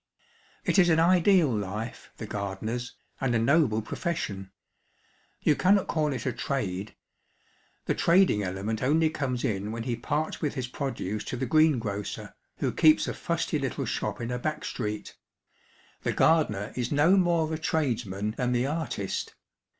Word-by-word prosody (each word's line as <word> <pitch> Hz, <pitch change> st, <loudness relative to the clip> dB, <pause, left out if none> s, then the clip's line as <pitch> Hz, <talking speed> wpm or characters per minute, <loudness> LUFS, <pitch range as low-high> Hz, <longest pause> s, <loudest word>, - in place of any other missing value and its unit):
It -, -, +3 dB
is 175 Hz, -2 st, +6 dB
an 160 Hz, -1 st, +4 dB
ideal 175 Hz, -, +4 dB
life, 105 Hz, +3 st, -5 dB
the -, -, -6 dB
gardener's, 110 Hz, +5 st, -4 dB, 0.2 s
and 130 Hz, -3 st, 0 dB
a -, -, +4 dB
noble 115 Hz, -2 st, +3 dB
profession. 105 Hz, -, -3 dB, 0.9 s
You 150 Hz, -, +3 dB
cannot 195 Hz, +4 st, +3 dB
call 155 Hz, -2 st, 0 dB
it 130 Hz, -, -4 dB
a 130 Hz, -, 0 dB
trade. 105 Hz, -7 st, -3 dB, 0.9 s
The -, -, +1 dB
trading 170 Hz, -, +4 dB
element 100 Hz, +3 st, -3 dB
only 155 Hz, +4 st, +3 dB
comes 130 Hz, -5 st, -2 dB
in 105 Hz, 0 st, -1 dB
when 115 Hz, 0 st, -4 dB
he 120 Hz, -1 st, -1 dB
parts 145 Hz, +6 st, -2 dB
with 150 Hz, -2 st, -1 dB
his 130 Hz, -2 st, -3 dB
produce 125 Hz, -6 st, -3 dB
to -, -, -4 dB
the 130 Hz, -, -1 dB
greengrocer, 120 Hz, -, +1 dB, 0.2 s
who -, -, 0 dB
keeps 155 Hz, -1 st, +4 dB
a -, -, -2 dB
fusty 165 Hz, -2 st, -1 dB
little 135 Hz, -4 st, -2 dB
shop -, -, -2 dB
in 115 Hz, +1 st, -3 dB
a 125 Hz, -, -2 dB
back 155 Hz, +4 st, -3 dB
street. 105 Hz, -3 st, -4 dB, 0.9 s
The -, -, -1 dB
gardener 110 Hz, -11 st, +2 dB
is 125 Hz, -1 st, -2 dB
no 150 Hz, +6 st, +5 dB
more 170 Hz, -4 st, +2 dB
a 155 Hz, -, -3 dB
tradesman 115 Hz, -, -1 dB
than 125 Hz, -1 st, +1 dB
the 120 Hz, +1 st, +1 dB
artist. 145 Hz, -9 st, -3 dB
130 Hz, 160 wpm, -28 LUFS, 110-155 Hz, 0.9 s, is